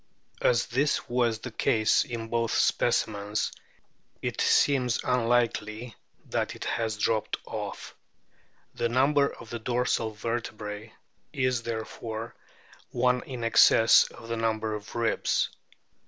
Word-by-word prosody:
As 120 -1 +3
this 140 +4 0
was 120 -2 +1
the 125 +3 -8
case 110 0 +2
in 115 -2 -5
both 115 -1 0
specimens 105 -3 +1 0.7
it - - -3
seems 125 -5 +3
unlikely 115 -2 0 0.3
that - - -2
it - - -7
has 110 -2 -1
dropped 110 +1 0
off. - - -6 0.8
The 120 - -1
number 140 +3 +3
of 115 - -12
the 120 - -4
dorsal 120 -1 0
vertebrae 110 -1 -5 0.4
is 130 -4 0
therefore 115 0 -5 0.6
one 125 0 +1
in 125 -3 -6
excess 115 0 +6
of 115 - -11
the 115 0 -2
number 110 -1 -1
of 105 0 -7
ribs. 115 -1 +1
115 Hz, 120 wpm, -27 LUFS, 110-125 Hz, 0.8 s, excess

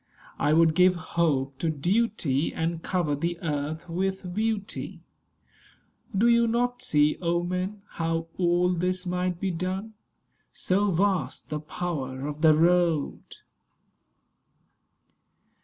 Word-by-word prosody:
I 145 - +2
would 165 0 +5
give 180 +2 +5
hope 150 -6 -1
to 165 - 0
duty, 165 - 0
And 165 0 -2
cover 175 -5 0
the 170 +4 -2
earth 150 +1 -3
with 185 +1 -2
beauty. 215 0 -3 1.2
Do 225 +4 +4
you 235 0 +4
not 245 +2 0
see, 150 -11 +2
O 170 0 +1
men! 185 +3 -3
how 165 0 -2
all 175 0 +3
this 180 +2 -1
might 180 -1 -1
be 190 0 -1
done? 185 +5 -3 0.6
So 200 +2 +1
vast 190 0 0
the 150 - -1
power 145 -5 -4
of 150 +1 -5
the 160 -2 +6
Road! 170 -2 +1
175 Hz, 120 wpm, -26 LUFS, 160-190 Hz, 1.2 s, the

